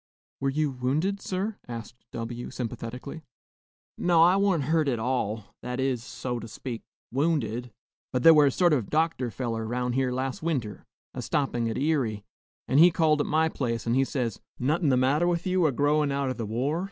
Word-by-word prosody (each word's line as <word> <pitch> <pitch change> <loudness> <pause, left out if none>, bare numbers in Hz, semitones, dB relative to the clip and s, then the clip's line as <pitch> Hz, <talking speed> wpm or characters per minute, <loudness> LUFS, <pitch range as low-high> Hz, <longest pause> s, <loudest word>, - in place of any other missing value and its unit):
"Were 135 - 0
you 150 +1 0
wounded, 145 +11 -1
sir?" 195 +3 -3
asked 115 -1 -7 0.2
W, 120 +1 -5
sympathetically. 125 +5 -6 0.8
"No, 170 -2 +5
I 180 +2 +6
wa'n't 195 -6 +2
hurt 155 +1 +1
at 125 -3 +1
all, 110 -3 -2
that 125 +1 -4
is, 130 -3 0
so 120 0 -4
to 115 - -8
speak, 120 0 -6 0.3
wounded. 125 -4 0 0.4
But 125 -1 -1
thar 165 - +10
were 150 -2 +6
a - - +2
sort 175 +3 +3
of 120 -9 0
a - - -15
doctor 155 -5 +1
feller 115 -2 -3
'round 125 +1 -1
here 130 0 +1
las' 130 +1 -3
winter, 135 -11 -3 0.3
a - - -5
stoppin' 125 -5 0
at 110 - -3
Erie; 130 -9 0 0.4
an' 135 - +3
he 170 +3 +9
called 155 -3 +2
at - - -2
my 160 +1 +3
place, 120 -7 -2
an' 115 - +1
he 135 +2 +4
says, 125 -5 -3 0.2
'No'hun 150 +5 +1
the 130 - +3
matter 140 +7 +3
wi' 175 -1 +2
you, 185 -3 +2
a - - +1
growin 145 +2 +2
out 140 -1 0
o' - - -1
the 115 -4 -5
war?' 130 +9 -1
135 Hz, 200 wpm, -27 LUFS, 120-155 Hz, 0.8 s, thar